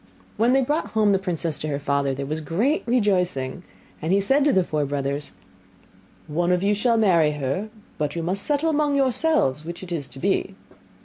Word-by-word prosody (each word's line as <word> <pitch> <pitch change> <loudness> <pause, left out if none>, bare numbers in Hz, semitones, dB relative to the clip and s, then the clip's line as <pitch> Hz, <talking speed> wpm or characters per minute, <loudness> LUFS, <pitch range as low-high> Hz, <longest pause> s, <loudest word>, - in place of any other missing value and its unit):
When 235 +3 +3
they 270 - +4
had - - -1
brought 305 +3 0
home 215 -2 +3
the 195 - +3
princess 170 -4 -2
to 155 - -3
her 145 -2 -1
father, 140 -1 0
there 140 +1 -4
was 155 +3 -3
great 215 - 0
rejoicing; 180 - 0 0.4
and 160 +3 -1
he 195 - +4
said 270 +9 +2
to 295 - +4
the 190 -7 +3
four 155 -3 -1
brothers, 140 +1 -3 0.9
'One 175 +3 0
of 180 +1 +1
you 205 +1 +3
shall 230 +3 +2
marry 170 -8 +3
her, 145 +9 -3 0.3
but 150 0 -2
you 165 - -2
must 185 +4 -2
settle 295 +6 +1
amongst 295 -2 +1
yourselves 265 - +2
which 170 +3 -7
it 180 - -9
is 150 -6 -3
to 130 - -14
be. - - -1
180 Hz, 205 wpm, -23 LUFS, 150-230 Hz, 0.9 s, they